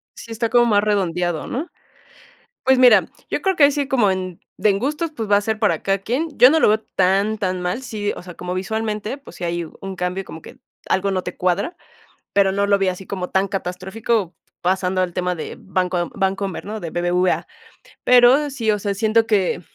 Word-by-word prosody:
Sí, 230 - -11
está 225 0 -1
como 240 -1 +4
más 205 -3 +3
redondeado, 175 -5 0
¿no? 290 +8 -3 1.0
Pues 265 0 +4
mira, 250 -1 +6 0.2
yo - - -2
creo 385 -1 +1
que 310 - +4
ahí 285 - +7
sí, 280 -1 -1
como 235 -8 +3
en 185 -2 -4 0.2
de 210 +2 +3
en 195 - +1
gustos, 300 +6 -2
pues, 220 -5 -4
va 205 - +5
a - - +1
ser 215 +1 -2
para 210 - +1
cada 195 0 +1
quien, 255 +11 -2
yo 250 - +8
no 320 +2 +3
lo - - +4
veo 215 - +3 0.2
tan 195 +3 +2
tan 185 -3 -2
mal, 180 +9 -2
sí, 210 -4 -3
o - - -9
sea, 180 -1 -10
como 180 +2 -5
visualmente, 215 +4 -3
pues, 280 - -14
si - - -7
hay 170 0 -2 0.2
un 195 -1 -6
cambio 180 +1 -3
como 160 - -10
que - - -13 0.3
algo 195 +1 +1
no 185 -1 0
te 180 - -7
cuadra, 190 - -1 0.6
pero, 200 -1 +4
no 200 +1 +1
lo 200 0 +3
vi 195 -1 +1
así 185 +1 -4
como 185 -2 -4
tan 190 +1 +1
catastrófico, 190 +2 -2 0.3
pasando 185 0 +1
al 180 -1 -2
tema 180 0 -1
de 160 - -7
banco 185 -1 -1
de 175 - -5
Bancomer, 195 0 -2
¿no? 215 +2 -5
De 170 - -5
BBVA. 175 +1 0 0.6
Pero 250 +4 +6
sí, 230 -5 0
o 210 - 0
sea, 200 0 -2
siento 220 +2 +2
que, 195 -5 +1
200 Hz, 220 wpm, -21 LUFS, 185-225 Hz, 1.0 s, yo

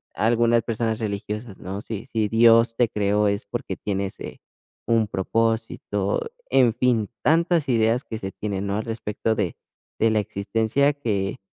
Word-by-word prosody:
algunas 115 0 +3
personas 115 -1 -1
religiosas, 105 0 -4
¿no?, 95 +3 -5
si 110 -2 -6
si 110 -2 -1
Dios 115 0 +5
te 120 - +4
creó 105 0 +1
es 100 0 -1
porque - - -4
tienes, 100 -1 -3
eh, - - -8 0.5
un 115 -2 +3
propósito, 115 - -1 0.3
en 125 -4 +4
fin. 120 -4 +1
Tantas 165 -1 +3
ideas 115 +1 +2
que 110 - -5
se 95 0 -5
tienen, 100 -1 -4
¿no?, 100 +1 -1
al 110 - -3
respecto 110 -1 -2
de - - -2 0.4
de 115 0 +3
la 110 - +2
existencia, 110 +8 +1
que 105 -10 -2
110 Hz, 155 wpm, -24 LUFS, 105-115 Hz, 0.5 s, Dios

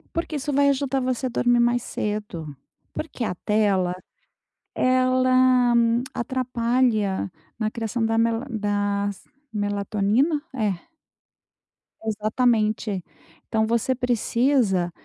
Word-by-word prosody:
Porque 330 -2 -2
isso 290 +1 -3
vai 280 +1 +4
ajudar 270 -1 0
você 255 0 -1
a - - -3
dormir 245 0 +2
mais 240 0 +2
cedo. 205 -8 -4 0.4
Porque 280 -6 -4
a 180 - -2
tela, 195 -3 +1 0.8
ela 255 -1 +3 0.4
atrapalha 240 -5 0 0.3
na 215 -1 0
criação 225 0 -2
da 225 0 +1
mela 230 +2 +1
das 205 -2 -1 0.3
melatonina? 210 - 0
É. 215 - -2 1.2
Exatamente. 215 -2 0 0.4
Então, 220 0 +1
você 235 +3 +1
precisa 235 -6 +1
230 Hz, 100 wpm, -24 LUFS, 205-255 Hz, 1.2 s, vai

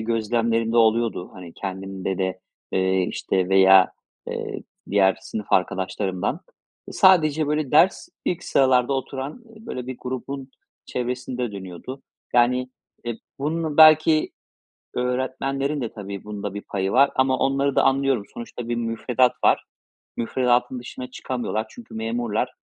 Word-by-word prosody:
gözlemlerim 115 0 0
de - - +1
oluyordu, 115 -4 +2
hani, 90 -3 -10
kendimde 95 -1 -4
de, 95 -1 -2 0.3
eee, 95 0 +2
işte, 95 -1 -1
veya, 95 -1 +6 0.4
eee, - - -5 0.3
diğer 95 -1 +4
sınıf 105 -2 -6
arkadaşlarımdan. 95 0 0 0.5
Sadece 160 -5 +4
böyle 150 -2 -1
ders, 175 +5 +4 0.2
ilk 175 - -1
sıralarda 130 -1 +3
oturan 135 - -4
böyle 220 - -8
bir 130 -1 -5
grubun 130 +1 -5 0.4
çevresinde 125 -1 -3
dönüyordu. 95 +7 -8 0.3
Yani, 125 +1 +3 0.3
eee, 120 -1 -4 0.2
bunun 155 +1 -2
belki 155 0 +6 0.6
öğretmenlerin 135 +3 -1
de 120 -3 -4
tabii 100 -2 -7
bunda 105 -1 -5
bir 105 - -5
payı 95 -1 -2
var 140 +2 +5
ama 130 0 +2
onları 135 +1 +1
da - - +5
anlıyorum. 135 -4 +2
Sonuçta 120 0 -7
bir 120 - 0
müfredat 120 +2 +1
var. - - +4 0.5
Müfredatın 125 +1 +1
dışına 125 +1 -8
çıkamıyorlar. 120 -4 -3
Çünkü 240 - -13
memurlar. 115 +2 -2
120 Hz, 125 wpm, -23 LUFS, 105-135 Hz, 0.6 s, veya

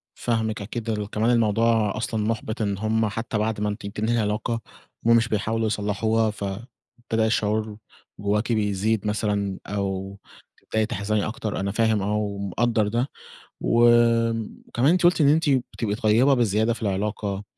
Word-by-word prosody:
فاهمِك 110 -2 -1
أكيد، 115 +2 -4
ال 105 -1 -3
كمان 110 +3 +1
الموضوع 115 -2 +2
أصلًا 110 -1 -2
مُحبِط 110 +1 -2
إن 100 -2 -1
هم 110 +1 +1
حتى 115 +1 -3
بعد 110 0 -1
ما 105 - 0
أنتِ 105 0 -5
بتنهي 110 +3 -1
العلاقة، 110 +2 -1 0.5
هم 115 0 +6
مش 115 0 +2
بيحاولوا 110 +1 0
يصلّحوها 110 +1 0
فابتدى 110 +2 -4
الشعور 110 -1 0 0.4
جواكِ 105 +3 0
بيزيد 105 0 0
مثلًا، 105 -2 -1
أو 100 -1 -3 0.4
تبدئي 110 -1 -1
تحزني 105 0 -1
أكتر، 110 -3 -4
أنا 100 0 -1
فاهم 110 -2 +2
آه، 105 +2 -1
ومقدّر 105 +2 0
ده، 120 +5 0 0.5
وكمان 115 +2 +2
أنتِ 180 -1 +2
قلتِ 175 -2 +4
إن 140 - +5
أنتِ 155 0 +3
بتبقي 120 -5 -1
طيبة 115 +6 +3
بزيادة 110 -1 +2
في 120 - -10
العلاقة، 100 0 -2
110 Hz, 145 wpm, -24 LUFS, 105-115 Hz, 0.5 s, هم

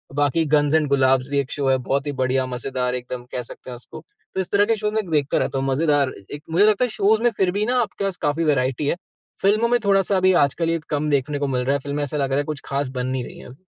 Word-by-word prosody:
बाकी 145 +2 +2
गंस 145 +1 +2
एण्ड 155 -2 +2
गुलाब्स 130 -1 +3
भी 140 0 +1
एक 135 -2 -3
शो 140 -2 -1
है 130 - +4
बहुत 135 +3 -2
ही - - 0
बढ़िया, 130 +1 +1
मज़ेदार 125 0 -2
एकदम 125 0 -6
कह 125 - -3
सकते 125 - -10
हैं 125 - -6
उसको। 120 - -11 0.3
तो - - -2
इस 190 - -3
तरह 205 0 +4
के 225 +1 +2
शोज 210 0 -2
में 220 0 0
देखता 145 -3 +1
रहता - - -1
हूँ 135 - -2
मज़ेदार 145 -1 +2 0.2
एक 145 +1 -7
मुझे 185 +6 +5
लगता 215 +3 +3
है - - -4
शोज 215 +1 +2
में 240 - +4
फिर 190 -2 +2
भी 205 +3 -1
ना 250 +2 +1
आपके 200 -3 -4
पास 195 -2 -2
काफ़ी 150 +3 0
वेराइटी 135 -2 +1
है। - - +1 0.5
फिल्मों 215 +4 +3
में 245 0 +3
थोड़ा-सा 195 0 +3
अभी 185 0 +4
आजकल 165 +4 -2
ये 165 0 0
कम 150 0 -1
देखने 145 0 0
को 145 - -1
मिल 125 -2 -1
रहा 135 - +2
है। 140 - 0
फिल्में 145 +2 -3
ऐसा 145 +1 -2
लग 140 -2 0
रहा 135 - +1
है - - 0
कुछ 150 -2 -4
ख़ास 140 -1 -2
बन 125 - -1
नहीं 130 -1 -2
रही - - -10
है - - -12
अब। 125 - -12
145 Hz, 285 wpm, -22 LUFS, 135-190 Hz, 0.5 s, मुझे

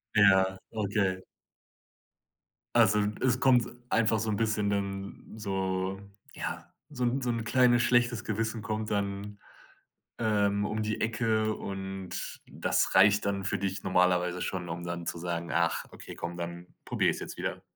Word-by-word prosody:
Ja, 95 -2 +5
okay. 100 -3 0 1.5
Also, 105 -1 +5
d 105 - -4
es 130 -1 +2
kommt 125 -3 +4 0.2
einfach 110 -1 +3
so 110 0 -1
'n 105 - 0
bisschen 110 -2 +1
dann 100 +1 -4
so 95 -2 -2 0.3
ja, - - -5 0.2
so 130 -4 -4
'n 125 +3 +1
so 125 - -1
'n 115 -1 -1
kleines 120 0 +4
schlechtes 120 -1 +2
Gewissen 115 +1 -2
kommt 110 +1 -3
dann, 100 0 -2 0.8
ähm, 105 -2 +2
um 110 +1 -2
die 110 0 -2
Ecke 110 -1 +1
und 95 -1 -5
das - - 0
reicht 100 +2 +6
dann 100 -1 -1
für 100 -1 0
dich 95 0 -2
normalerweise 90 -1 +2
schon, 90 -2 -3
um 85 +1 -4
dann 85 -1 -5
zu 85 - -2
sagen: 85 0 -3
„Ach - - +1
okay, - - -10
komm, 85 0 -5
dann 85 +1 -6 0.2
probiere - - +2
ich's - - -2
jetzt - - -7
wieder.“ - - -3
100 Hz, 155 wpm, -29 LUFS, 95-110 Hz, 1.5 s, reicht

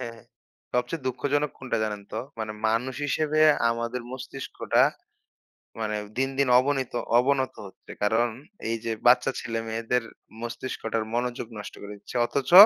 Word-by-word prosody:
হ্যাঁ। 115 -2 -6 0.5
সবচেয়ে 125 +4 0
দুঃখজনক 145 +3 +1
কোনটা 125 -4 -1
জানেন 105 -1 -3
তো? 110 - -1 0.2
মানে 110 -1 -2 0.2
মানুষ 120 +4 0
হিসেবে 155 +1 +1 0.3
আমাদের 115 +1 -2
মস্তিষ্কটা 130 +1 0 1.0
মানে 105 -1 -1 0.2
দিন, 135 0 +2
দিন 140 -2 +4
অবনিত 135 -1 0 0.3
অবনত 130 +1 +2
হচ্ছে। 95 - -15
কারণ 110 +3 +3 0.4
এই 115 - +1
যে 115 - 0
বাচ্চা 125 +2 +6
ছেলেমেয়েদের 115 +1 -1 0.4
মস্তিষ্কটার 115 -2 -3
মনোযোগ 120 0 -1
নষ্ট 105 - -7
করে 100 0 -7
দিচ্ছে। 105 - -8
অথচ 135 +1 -1
120 Hz, 135 wpm, -27 LUFS, 115-130 Hz, 1.0 s, বাচ্চা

